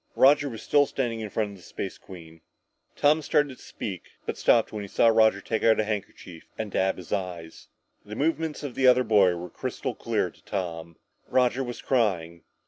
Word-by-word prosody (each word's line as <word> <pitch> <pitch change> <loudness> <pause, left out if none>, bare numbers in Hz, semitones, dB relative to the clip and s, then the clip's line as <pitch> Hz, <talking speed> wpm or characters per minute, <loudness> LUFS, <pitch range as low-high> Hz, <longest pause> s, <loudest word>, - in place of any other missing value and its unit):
Roger 140 +1 +5
was 115 -3 -8
still 145 -1 +3
standing 120 -4 -2
in 110 -1 -5
front 105 0 -2
of 100 - -11
the - - -17
Space 95 +3 -6
Queen! 80 -3 -13 0.5
Tom 150 +2 +3
started 145 -2 +1
to - - -16
speak, 95 -5 -6 0.2
but - - -3
stopped 115 -2 +3
when 105 -1 -4
he - - -7
saw 115 - +3
Roger 110 -3 +4
take 110 +3 -2
out 115 -1 +4
a - - +3
handkerchief 100 -5 -6
and 110 -2 -4
dab 95 0 +1
at - - -21
his 90 -3 -7
eyes. 90 -4 -5 0.4
The 105 +1 -8
movements 160 +2 -1
of 140 -4 -5
the 130 +1 +2
other 125 0 +6
boy 100 -6 +4
were 85 +1 -6
crystal - - -4
clear - - -1
to - - -25
Tom. 85 -4 -5 0.3
Roger 125 +1 +2
was 120 -1 -7
crying! 90 -10 0
110 Hz, 205 wpm, -26 LUFS, 90-130 Hz, 0.5 s, other